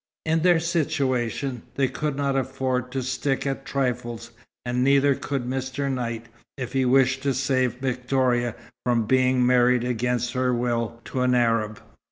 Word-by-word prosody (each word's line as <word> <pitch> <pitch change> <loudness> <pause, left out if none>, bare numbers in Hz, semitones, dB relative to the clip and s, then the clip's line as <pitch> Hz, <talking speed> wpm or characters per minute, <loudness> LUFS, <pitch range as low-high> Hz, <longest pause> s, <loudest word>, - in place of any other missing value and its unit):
In 160 0 +2
their 175 -1 +4
situation, 140 -6 -1
they 135 -1 +2
could 150 +1 -3
not 140 -1 0
afford 130 -1 -1
to 130 0 -2
stick 130 +2 -1
at 135 0 -3
trifles, 120 -3 -2 0.3
and 125 +1 0
neither 140 +1 +4
could 135 -1 -3
Mr. 130 +2 -2
Knight, 115 -3 -3 0.3
if 125 -2 -5
he 135 -1 +2
wished 130 +1 +3
to 140 -1 0
save 130 -2 +1
Victoria 125 -2 0 0.3
from 120 -2 +1
being 130 +1 +3
married 125 -1 +4
against 125 0 -1
her 125 -1 +1
will 115 -1 -1
to 130 - -3
an 125 0 +3
Arab. 115 -3 +1
130 Hz, 155 wpm, -24 LUFS, 120-135 Hz, 0.3 s, their